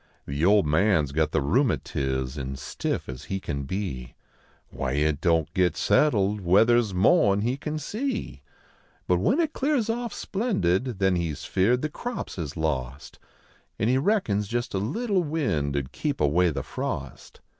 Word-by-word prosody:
The 70 +3 -3
old 100 +1 +5
man 80 +3 +3
s 70 - -5
got 80 +2 +1
the - - +1
rheumatix, 70 - 0
an 65 -2 -4
stiff 65 -1 -4
as 65 +2 -8
he 95 - -3
can 70 -6 -4
be; 65 -9 -4 0.6
Why 65 -1 -3
it 75 +1 +1
don 80 -3 +3
t - - -34
git 90 -4 +1
settled 105 -8 +2
weather 105 +7 +5
s 110 -4 -1
moah 100 - +4
n 100 - 0
he 120 +4 0
can 150 +2 -4
see? 220 - -4 0.7
But 90 -1 +3
when 240 - +2
it 320 -2 +1
clears 265 -5 +1
oft 235 0 -4
spk 220 +4 -2
ndid, 95 +7 +1
then 95 -2 +2
he 85 -1 -1
s 75 - -6
feared 120 +8 +2
the 155 - 0
crops 240 - -6
is 75 -1 -5
lost 70 -4 -3 0.6
An 110 - +1
he 130 +1 +3
reckons 135 - +1
jest 120 +3 -3
a 95 - 0
little 195 - 0
wind 80 - -1
nd 65 -2 -3
keep 145 -3 -3
away 85 +5 +3
the 75 - -3
frost. - - -6
95 Hz, 180 wpm, -26 LUFS, -, 0.7 s, old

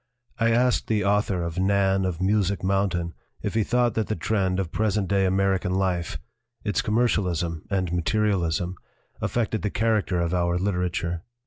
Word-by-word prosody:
I 115 0 +3
asked 125 +2 +2
the 105 -3 +1
author 100 -3 +1
of 85 +1 -3
Nan 95 0 +2
of 90 -3 -2
Music 100 -1 +1
Mountain 95 -3 0 0.3
if - - -2
he 110 -1 +2
thought 120 +1 +2
that 110 -1 -1
the 110 - -1
trend 95 +2 0
of 90 -4 -2
present 105 -2 0
day 100 0 +2
American 95 -1 +1
life 90 -4 -1 0.5
its 105 -5 0
commercialism 90 -8 0
and 95 -3 -1
material 100 +2 +1
ism 85 +2 -2 0.4
affected 110 -2 -1
the 105 - -1
character 105 -4 +1
of 85 0 0
our 85 -1 +1
literature. 90 -3 -1
95 Hz, 160 wpm, -25 LUFS, 90-105 Hz, 0.5 s, I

